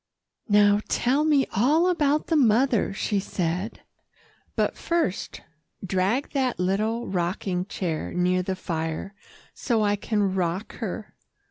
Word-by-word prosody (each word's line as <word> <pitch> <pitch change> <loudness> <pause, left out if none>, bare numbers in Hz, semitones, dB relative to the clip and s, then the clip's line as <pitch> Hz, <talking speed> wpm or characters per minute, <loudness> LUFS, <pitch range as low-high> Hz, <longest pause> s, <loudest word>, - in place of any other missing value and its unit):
"Now, 205 0 +5
tell 265 +5 +1
me 295 -3 +3
all 295 - +3
about 300 -4 +2
the 330 - 0
mother," 245 -4 +3
she 200 +1 -1
said, 180 +2 -3 0.7
"but - - 0
first 335 - -2 0.4
drag 195 +9 0
that 260 -3 0
little 215 +6 0
rocking 180 0 -2
chair 170 -6 -3
near 180 +1 +1
the 185 +1 -2
fire, 165 +1 -4 0.4
so 230 -5 0
I 205 0 +2
can 205 -2 0
rock 185 +2 -2
her." 220 -1 -5
205 Hz, 125 wpm, -25 LUFS, 185-250 Hz, 0.7 s, Now